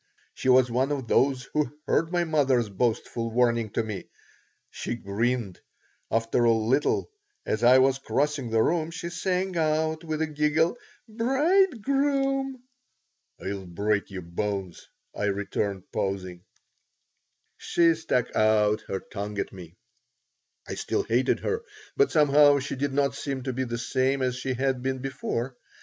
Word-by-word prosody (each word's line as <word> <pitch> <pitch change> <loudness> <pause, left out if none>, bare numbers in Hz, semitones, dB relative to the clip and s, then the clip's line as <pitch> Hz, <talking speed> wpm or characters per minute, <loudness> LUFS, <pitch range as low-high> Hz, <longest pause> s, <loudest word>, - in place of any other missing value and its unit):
She 130 - -2
was 125 -1 +5
one 130 +4 +1
of 135 -4 -3
those 130 +1 +2
who 150 -1 -1
heard 165 +1 +1
my 175 -1 +2
mother's 135 -8 +2
boastful 115 +2 -1
warning 115 -1 +2
to 115 - 0
me. 105 -3 -6 0.6
She - - -4
grinned. 115 -1 -2 0.5
After 115 +1 +1
a 115 - +5
little, 115 - +1 0.3
as 110 +2 -1
I 125 +2 +7
was 135 +1 +3
crossing 140 -2 -1
the 110 0 +3
room, 165 -1 +1
she 170 0 -6
sang 185 +1 -1
out 160 0 0
with 160 -1 -2
a - - +2
giggle: 155 +4 +1 0.3
"Bridegroom!" 270 - +1 0.8
"I'll 95 -1 -4
break 100 +4 -1
your 95 -2 -7
bones," 95 +1 -4 0.3
I 105 - -1
returned, 100 -1 -2
pausing 95 -2 -3 1.1
She 170 -1 +3
stuck 155 -6 -1
out 110 0 +3
her 95 - -3
tongue 105 0 -6
at - - -3
me 90 -4 -11 0.9
I - - -4
still - - -1
hated 125 +3 +1
her, 450 +1 -1 0.3
but, 420 - +4
somehow, 145 -1 +5
she 140 +1 -3
did 140 +1 -1
not 140 0 +1
seem 135 -2 -4
to 130 -1 -3
be 130 +1 -1
the 120 -1 -3
same 130 +2 0
as 125 -1 0
she 130 0 -3
had 130 0 0
been 130 +1 -1
before. 130 -1 -3
130 Hz, 150 wpm, -26 LUFS, 110-155 Hz, 1.1 s, I